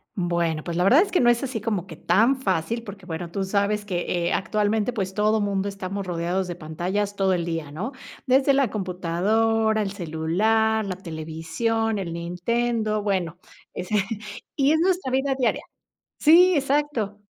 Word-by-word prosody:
Bueno, 170 -4 0
pues, 170 -1 -4
la 180 - +2
verdad 260 - +6
es 400 - -1
que 360 - +3
no 240 - +5
es 240 +2 +2
así 245 -5 -3
como 205 -5 -2
que 160 - -9
tan 230 - +3
fácil, 195 +4 -1
porque, 200 -3 -10
bueno, 170 0 -5
tú 195 +1 -2
sabes 205 +1 0
que, 180 -4 -2 0.2
eh, - - 0
actualmente, 210 +3 0
pues, 195 -5 -3
todo 215 +2 +2
mundo 200 -1 -1
estamos 195 0 -5
rodeados 180 +1 -1
de 175 - -5
pantallas 180 +6 -3
todo 190 -1 +2
el 170 -2 -1
día, 165 -4 -4
¿no? 195 - -4 0.3
Desde 270 +1 +4
la 270 -5 +2
computadora, 215 +4 +1
el 200 -2 -2
celular, 205 +6 +1
la 185 - -3
televisión, 190 +7 -2
el 175 -4 -4
Nintendo, 215 +6 -1
bueno, 185 -5 -1 0.4
ese, 185 +4 -3 0.6
y 280 +1 +4
es 315 - +2
nuestra 360 -5 +1
vida 270 +1 +1
diaria 255 -3 0 0.6
sí, 355 +4 +7
exacto. 275 -7 0
205 Hz, 170 wpm, -24 LUFS, 175-225 Hz, 0.6 s, sí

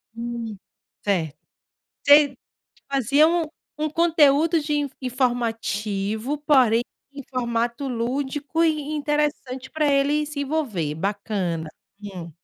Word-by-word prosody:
Hum. 230 -3 -5 0.5
Certo. 170 -7 0 0.7
Você 285 -2 +6 0.5
fazia 275 +3 +4
um 335 -1 +1 0.4
um 310 - +1
conteúdo 320 0 +4
de 295 0 -2 0.3
informativo, 230 -2 -1
porém 260 -6 +4 0.3
em 280 -1 -8
formato 240 +1 -1
lúdico 270 +6 -2
e 325 - +5 0.2
interessante 295 -3 -2
para 310 -1 +1
ele 285 +2 +2
se 295 -1 -4
envolver, 255 - -1
bacana 190 -3 -2 0.3
hum. 185 -5 -7
260 Hz, 100 wpm, -24 LUFS, 220-295 Hz, 0.7 s, Você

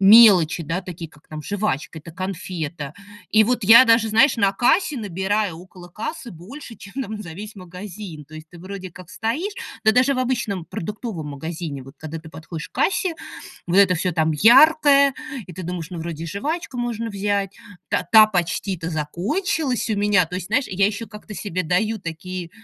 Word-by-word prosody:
мелочи, 195 -6 +7
да, 165 +5 -2
такие, 170 -3 -8
как 150 0 -23
там 155 0 -7
жвачка, 190 -5 -3
эта 165 +2 -11
конфета. 170 -5 -5 0.4
И 220 0 +5
вот 245 +1 0
я 230 +5 +9
даже, 225 -1 +4
знаешь, 240 +5 +4
на 200 -3 +2
кассе 300 - +2
набираю, 195 -2 -1
около 180 0 -13
кассы 235 - -6
больше, 230 - -10
чем 220 +8 -7
там 215 0 -6
за 170 - -9
весь 210 +5 -8
магазин. 180 -3 -9
То 155 +2 -15
есть 155 0 -10
ты 175 - -13
вроде 185 +1 -8
как 180 +1 -13
стоишь. 270 - -2 0.3
Да 220 - +6
даже 255 +4 +3
в - - -3
обычном 240 -8 -1
продуктовом 180 -1 -6
магазине 145 +4 -6 0.3
вот, 135 - -13
когда 160 +1 -7
ты 160 0 -12
подходишь 160 0 -8
к - - -56
кассе, 355 +5 0 0.5
вот 175 - +1
это 195 -2 +6
всё 180 +2 -1
там 160 -1 +1
яркое, 280 - +6 0.3
и 180 - -10
ты 185 +2 -7
думаешь: 175 0 -5
"Ну, 175 - -6
вроде 165 0 -5
и - - -5
жвачку 280 - -4
можно 230 -1 -2
взять, 200 -1 -2 0.3
та - - +1
та 220 -1 +9
почти-то 180 -2 -2
закончилась 235 - -1
у - - +2
меня". 205 -3 +3
То 180 - -8
есть, 180 0 -4
знаешь, 255 +5 +1
я 195 +1 +2
ещё 215 +2 -3
как-то 210 0 -10
себе 185 -3 -3
даю 210 +7 0
такие, 170 +1 -6
195 Hz, 190 wpm, -22 LUFS, 170-225 Hz, 0.5 s, я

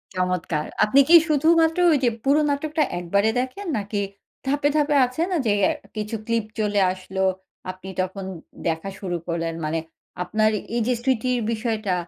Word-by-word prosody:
চমৎকার। 180 -4 -1 0.2
আপনি 215 +6 +4
কি 345 - +9
শুধুমাত্র 320 +2 +3
ওই 305 - +4
যে 245 - +5
পুরো 280 +3 +4
নাটকটা 300 +2 0 0.2
একবারে 200 +5 +1
দেখেন? 260 +11 -4
নাকি 205 0 -2 0.5
ধাপে, 285 +1 +2
ধাপে 295 -1 +2
আছে 255 +6 -4
না - - +1
যে 215 - +3
অ্যা - - +4 0.2
কিছু 215 +1 -3
clip 230 -2 0
চলে 210 -1 +1
আসলো। 190 +1 -5 0.5
আপনি 185 +1 -11
তখন 190 +1 -4 0.4
দেখা 165 +4 -2
শুরু 180 -3 -3
করলেন 165 -1 -2
মানে 160 +2 -1 0.4
আপনার 215 +4 +2 0.3
এই 240 - +1
যে 250 - +3
স্মৃতির 250 -1 +1
বিষয়টা 220 -3 -1
215 Hz, 160 wpm, -23 LUFS, 185-275 Hz, 0.5 s, কি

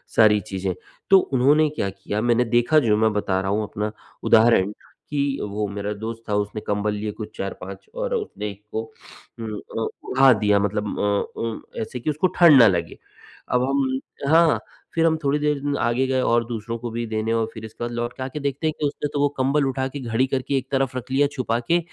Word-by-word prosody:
सारी 105 -1 +6
चीजें। 95 -3 -3 0.4
तो 195 - +8
उन्होंने 145 +1 +3
क्या 145 -10 -2
किया 100 +2 -4
मैंने 120 +1 +3
देखा 120 +6 +5
जो 105 -1 +4
मैं 110 0 +3
बता 100 -2 0
रहा 95 0 -2
हूँ 105 +1 +1
अपना 105 0 -3 0.3
उदाहरण 110 -3 +5 0.4
कि 140 -1 -1
वो 105 +1 -2
मेरा 100 +1 -3
दोस्त 115 +1 -5
था 105 - +1
उसने 105 +1 -2
कंबल 105 0 -1
लिए 105 +1 -3
कुछ 110 - -7
4-5 95 0 -6
और - - -2
उसने 420 - -4
इसको 105 +2 -6 0.6
उम, 110 -2 -4
अ, 115 - -4 0.2
उढ़ा 135 +1 +5
दिया 105 -1 +3
मतलब 105 +1 -1
अ, 100 0 -1
उम, 115 -1 -3 0.2
एसे 110 +3 -5
कि 120 - -2
उसको 155 +5 +2
ठंड 165 -6 +8
ना 115 - +8
लगे। 85 -4 -1 0.5
अब 125 - +2
हम 135 0 0 0.3
हाँ, 165 +1 +5 0.3
फिर 165 0 +2
हम 160 -1 +3
थोड़ी 140 +1 +2
देर 145 -1 0
आगे 120 +3 +1
गए 130 0 +1
और 120 -1 +2
दूसरों 115 0 -4
को 120 +1 -5
भी 120 +1 -3
देने 110 +1 -1
और 115 -1 +1
फिर 110 -1 -8
इसके 110 +2 -8
बाद 120 - -3
लौट 120 +1 -3
के 130 - -4
आके 135 +3 -5
देखते 140 +2 -2
हैं 155 - 0
कि 150 - 0
उसने 145 - -3
तो 145 - -1
वो 145 0 +3
कंबल 140 +2 +2
उठा 130 0 -1
के 140 +2 -7
घड़ी 120 0 0
करके 135 +1 -1
एक 130 +1 -5
तरफ 135 -1 0
रख 130 +1 -7
लिया 140 +2 +3
छुपा 120 -4 0
के 170 - +4
120 Hz, 215 wpm, -23 LUFS, 105-140 Hz, 0.6 s, तो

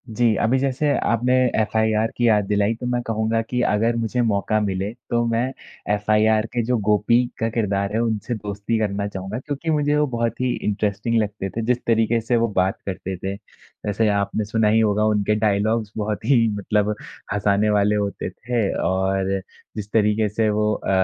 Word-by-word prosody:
जी, 115 0 +2
अभी 120 +3 +2
जैसे 135 +2 0
आपने 120 +2 +1 0.3
एफ़आईआर 110 0 +1
की 120 - +2
याद 105 -3 +3
दिलाई 105 +1 +2
तो 120 - -7
मैं 125 0 0
कहूँगा 110 0 0
कि 125 +2 -2
अगर 115 +3 +1
मुझे 115 +2 -1
मौका 110 -1 +1
मिले, 100 0 -2
तो 120 -1 -2
मैं 115 +1 +1 0.5
एफ़आईआर 110 +1 +2
के 120 -1 0
जो 125 +1 +1
गोपी 105 +4 +3 0.2
का 115 - 0
किरदार 100 -3 -1
है, 110 - +1
उनसे 115 0 -1
दोस्ती 105 +1 -3
करना 100 -1 -1
चाहूँगा, 100 +3 -5
क्योंकि 145 +4 -5
मुझे 150 -1 +2
वो 150 0 +2
बहुत 115 -2 -2
ही 130 -1 +1
इंटरेस्टिंग 105 +2 0
लगते 100 -2 -3
थे, 115 - -4
जिस 125 +1 +2
तरीके 115 0 +2
से 115 +2 0
वो 115 0 +2
बात 95 +1 +1
करते 95 -1 -4
थे। 95 +2 -4 0.5
वैसे 105 +2 +1
आपने 100 +1 -1
सुना 110 +1 +1
ही 110 +1 +4
होगा 105 -1 +2
उनके 105 -1 +2
डायलॉग्स 105 +1 +1
बहुत 105 0 -3
ही 120 -3 +4
मतलब 105 +1 0 0.4
हँसाने 105 +1 +2
वाले 105 0 +3
होते 100 -1 -2
थे 120 0 -3 0.2
और 95 +1 0 0.4
जिस 105 -2 -5
तरीके 105 0 +2
से 110 +1 +1
वो 105 0 +1
अ, - - -4
110 Hz, 185 wpm, -22 LUFS, 105-115 Hz, 0.5 s, ही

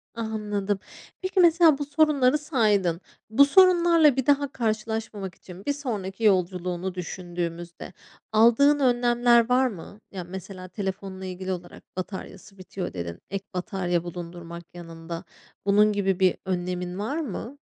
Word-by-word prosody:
Anladım. 210 -3 -2 0.4
Peki, 375 +1 -1
mesela 335 -4 +6
bu 290 - -3
sorunları 290 -2 +3
saydın. 210 - +1 0.3
Bu 275 +6 +6
sorunlarla 340 -3 +5
bir 265 -2 -1
daha 285 -1 +2
karşılaşmamak 220 -4 -3
için 185 +1 -13
bir 285 - +1
sonraki 225 -7 -5
yolculuğunu 185 -2 +1
düşündüğümüzde 175 -1 -5 0.4
aldığın 235 +7 +5
önlemler 240 -2 +3
var 255 +1 +4
mı? 205 0 -9
Ya, 185 -3 -5
mesela 185 +1 -8
telefonla 190 -1 -5
ilgili 185 0 -5
olarak 175 -1 -7
"Bataryası 195 +1 -7
bitiyor." 185 0 -6
dedin, 85 -1 -5
ek 195 +1 -4
batarya 180 -1 -1
bulundurmak 170 0 -8
yanında, 165 0 -8 0.4
bunun 210 +1 +4
gibi 195 -2 0
bir 185 -1 +3
önlemin 180 0 -3
var 225 +9 -2
mı? 275 - -5
200 Hz, 130 wpm, -25 LUFS, 180-250 Hz, 0.4 s, mesela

